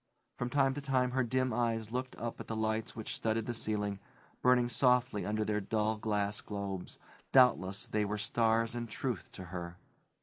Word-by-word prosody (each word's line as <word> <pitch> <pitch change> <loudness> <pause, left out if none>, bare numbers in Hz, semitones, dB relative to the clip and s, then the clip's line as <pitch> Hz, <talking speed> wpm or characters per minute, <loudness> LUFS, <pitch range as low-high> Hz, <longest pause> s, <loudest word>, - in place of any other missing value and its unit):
From 125 - -2
time 135 0 +3
to 145 - -5
time 130 -2 +1
her 130 +1 +2
dim 130 +1 0
eyes 115 -2 0
looked 125 +1 -3
up 115 0 -5
at - - -7
the 110 - -3
lights 110 +1 -1
which 110 -2 -4
studded 110 0 0
the 120 - -2
ceiling, 105 -3 -1 0.4
burning 125 -1 +5
softly 125 -4 +2
under 110 +1 0
their 105 0 0
dull 110 +2 0
glass 105 -1 0
globes; 100 -3 -5 0.3
doubtless 105 -7 +4
they 105 0 0
were 105 +1 -2
stars 115 +1 +2
in 120 -1 -3
truth 115 -1 -3
to 95 - -7
her. 85 0 -5
110 Hz, 180 wpm, -33 LUFS, 105-125 Hz, 0.4 s, burning